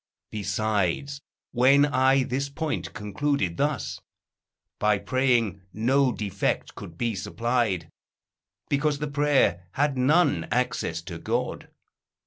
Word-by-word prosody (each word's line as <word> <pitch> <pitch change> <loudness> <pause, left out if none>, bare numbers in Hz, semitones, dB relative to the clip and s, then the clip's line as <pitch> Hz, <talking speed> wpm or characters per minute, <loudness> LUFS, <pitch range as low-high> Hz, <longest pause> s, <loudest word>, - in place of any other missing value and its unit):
Besides, 110 +5 -1 0.3
when 135 +4 +5
I 135 -1 +3
this 135 +3 -2
point 155 +2 -3
concluded 105 -2 -1
thus, 145 -3 -1 0.8
By 105 -1 +3
praying 120 -5 +1
no 130 +4 +2
defect 100 -4 -2
could 85 - -10
be 115 +2 0
supplied: 105 -2 -1 0.8
Because 145 +1 +1
the 150 - -3
prayer 140 -11 +2
had 140 -2 0
none 130 - +3
access 110 -8 -1
to 85 -1 -7
God. - - -3
125 Hz, 110 wpm, -26 LUFS, 100-140 Hz, 0.8 s, when